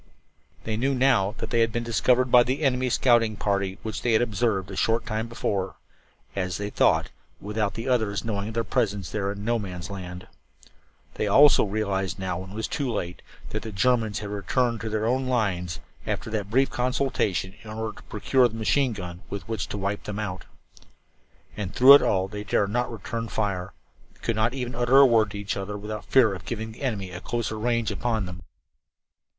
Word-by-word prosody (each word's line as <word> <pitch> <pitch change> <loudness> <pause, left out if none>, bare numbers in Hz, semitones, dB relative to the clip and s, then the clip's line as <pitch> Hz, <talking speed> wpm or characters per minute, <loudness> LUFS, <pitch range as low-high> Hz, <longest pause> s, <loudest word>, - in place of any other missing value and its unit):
They 110 -1 -2
knew 135 +4 +1
now 125 -6 +3
that - - -5
they 120 - +2
had 115 0 +3
been 120 +1 -2
discovered 125 +2 +2
by 125 - +8
the 130 +5 -1
enemy 130 -2 +2
scouting 115 -3 +3
party 100 -1 -1
which 110 -2 -4
they 120 - +1
had 110 - +4
observed 105 -4 -1
a - - -6
short 115 +4 +1
time 110 +1 -2
before 100 -4 -2 0.6
as 90 -2 -2
they 105 0 -4
thought, - - +2 0.3
without 105 -1 -2
the 115 +3 -5
others 110 -5 0
knowing 100 -2 -2
of 110 - -6
their 115 - +1
presence 100 -5 -1
there 100 -2 -1
in 100 0 -7
"No 120 0 +1
Man's 90 -2 -6
Land." 90 -2 -7 0.9
They 105 - -2
also 140 +7 +7
realized 95 -2 -1
now, 95 -2 -3
when 95 +1 -8
it 100 - -10
was 110 - -2
too 140 -5 -2
late, 90 -5 -4 0.3
that - - -3
the 110 - -7
Germans 110 +1 +1
had 105 - -5
returned 115 +4 0
to 110 - -3
their 110 0 -1
own 130 +3 +1
lines, 90 -10 -1 0.3
after 110 - -3
that 105 -3 -2
brief 135 +5 +2
consultation, 125 -7 0
in 110 - -11
order 110 -1 -4
to - - -13
procure 125 +4 +3
the 115 - -9
machine 120 +3 +1
gun 90 -3 -7
with 100 - -6
which 110 -1 -3
to - - -5
wipe 100 +1 -3
them 105 -1 -4
out. 100 -4 -4 1.1
And 100 -3 -5
through 130 +3 +9
it 140 - +9
all 95 -1 +1
they 105 +1 -6
dared 100 0 +1
not 120 +2 0
return 115 +1 -4
the - - -9
fire, 100 -3 -2 0.5
could 115 - 0
not 110 +4 +1
even 125 -2 -3
utter 120 +2 +3
a 140 - +9
word 115 -4 +4
to 100 - -7
each 100 -1 -3
other 100 +1 -4
without 105 +1 -6
fear 120 -6 +4
of 95 - -7
giving 110 -1 -4
the 110 - -14
enemy 105 -9 -2
a 90 +1 -7
closer 115 -2 -3
range 115 0 0
upon 110 -4 -1
them. 90 0 -8
110 Hz, 205 wpm, -26 LUFS, 100-120 Hz, 1.1 s, through